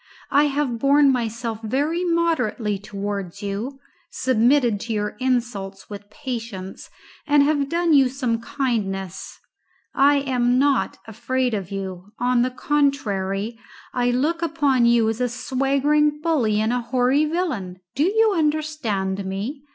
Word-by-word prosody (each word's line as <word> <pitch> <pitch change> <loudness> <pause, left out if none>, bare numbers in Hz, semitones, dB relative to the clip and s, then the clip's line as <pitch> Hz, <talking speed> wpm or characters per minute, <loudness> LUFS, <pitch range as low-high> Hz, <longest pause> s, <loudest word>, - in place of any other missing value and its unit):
I 290 +1 +5
have 280 -5 -1
borne 280 +2 +5
myself 230 -2 -3
very 290 +10 -1
moderately 285 - 0
towards 200 -2 -5
you, 215 +8 -4 0.3
submitted 245 -2 +2
to 230 +2 -4
your 210 -1 -1
insults 235 -7 -2
with 205 0 -9
patience, 230 -8 -6 0.4
and 290 -1 +5
have 285 -1 +1
done 340 -1 +2
you 270 -3 +5
some 245 -3 -2
kindness. 220 - -3 0.5
I 285 +1 +5
am 250 -2 +1
not 270 -7 +2
afraid 245 +3 -1
of 195 -4 -3
you. 195 0 -6
On 245 0 +2
the 250 - +2
contrary, 230 -7 -1 0.3
I 245 -1 +1
look 300 +7 0
upon 285 -7 +2
you 235 -2 +4
as 225 +2 -2
a 250 - +1
swaggering 275 +4 +1
bully 270 -10 +1
and 220 +2 +1
a 245 - 0
hoary 255 +5 +2
villain. 260 - -3
Do 280 - -2
you 435 +2 +3
understand 295 - -1
me? 210 +10 -5
250 Hz, 135 wpm, -22 LUFS, 210-285 Hz, 0.5 s, I